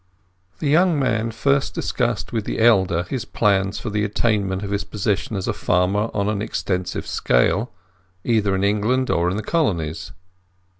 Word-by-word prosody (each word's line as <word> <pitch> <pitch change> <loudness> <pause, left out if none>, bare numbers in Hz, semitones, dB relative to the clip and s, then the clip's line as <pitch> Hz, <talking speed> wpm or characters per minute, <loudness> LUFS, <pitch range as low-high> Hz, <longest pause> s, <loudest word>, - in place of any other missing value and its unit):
The 155 - -3
young 170 +3 +4
man 115 -4 0
first 140 +4 0
discussed 120 -5 -2
with 110 -2 -1
the - - -3
elder 95 -7 +3
his 115 +6 -4
plans 100 -2 +1
for 110 - -5
the 105 0 0
attainment 105 -3 0
of 100 - -5
his 100 0 -1
position 105 +1 -2
as 95 - -3
a - - 0
farmer 95 +5 +1
on 100 -1 -1
an 105 -1 -1
extensive 90 -3 -3
scale—either 95 - -1
in 95 - -1
England 110 +6 +1
or 85 +1 +2
in 95 - -2
the 110 - -3
Colonies. 85 - -1
105 Hz, 160 wpm, -21 LUFS, 95-115 Hz, -, young